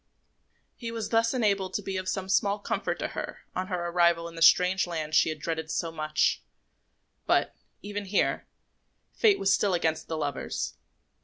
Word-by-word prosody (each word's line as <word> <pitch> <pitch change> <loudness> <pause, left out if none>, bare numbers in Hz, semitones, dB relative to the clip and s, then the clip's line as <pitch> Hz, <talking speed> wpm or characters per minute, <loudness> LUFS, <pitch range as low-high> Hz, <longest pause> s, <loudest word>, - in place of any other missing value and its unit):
He 235 - -6
was 230 -1 -4
thus 230 0 +3
enabled 200 -6 0
to 205 - -2
be 195 0 -4
of 185 0 -2
some 190 -1 -2
small 200 +1 +2
comfort 205 - -2
to - - -3
her - - -6
on 185 0 -2
her 180 -2 -2
arrival 170 -1 +3
in 170 - -10
the 165 - -8
strange 180 +3 +5
land 155 -3 -4
she 155 - +5
had 155 - -3
dreaded 160 +1 -4
so 165 0 -2
much; 155 -1 0 0.9
but, - - +2 0.3
even 205 0 -4
here, 195 +1 0 0.7
fate 425 -4 +4
was 195 +1 +2
still 200 -3 +2
against 160 -2 -1
the 160 - -3
lovers. 145 -3 -3
185 Hz, 175 wpm, -28 LUFS, 165-200 Hz, 0.9 s, strange